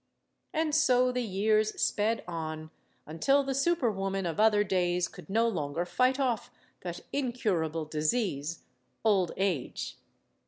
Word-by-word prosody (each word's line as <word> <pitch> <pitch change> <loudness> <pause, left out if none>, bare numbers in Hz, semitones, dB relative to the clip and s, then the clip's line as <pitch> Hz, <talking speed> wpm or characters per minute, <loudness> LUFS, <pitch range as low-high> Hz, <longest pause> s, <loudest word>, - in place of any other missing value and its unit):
And 315 -2 0
so 255 -5 +4
the 250 0 -1
years 215 0 +1
sped 220 +2 +1
on, 155 -2 -5 0.3
until 270 - +2
the 270 0 -2
super 275 -3 +2
woman 195 -1 -2
of 170 +3 -3
other 215 -1 +5
days 180 -2 +1
could - - -13
no 225 +4 +3
longer 160 -5 -2
fight 255 +9 +2
off 240 -3 0 0.3
that 175 -1 -6
Incurable 195 - -1
disease, 155 - -1 0.4
old 195 -5 +3
age. 185 -9 -2
205 Hz, 130 wpm, -30 LUFS, 170-245 Hz, 0.4 s, other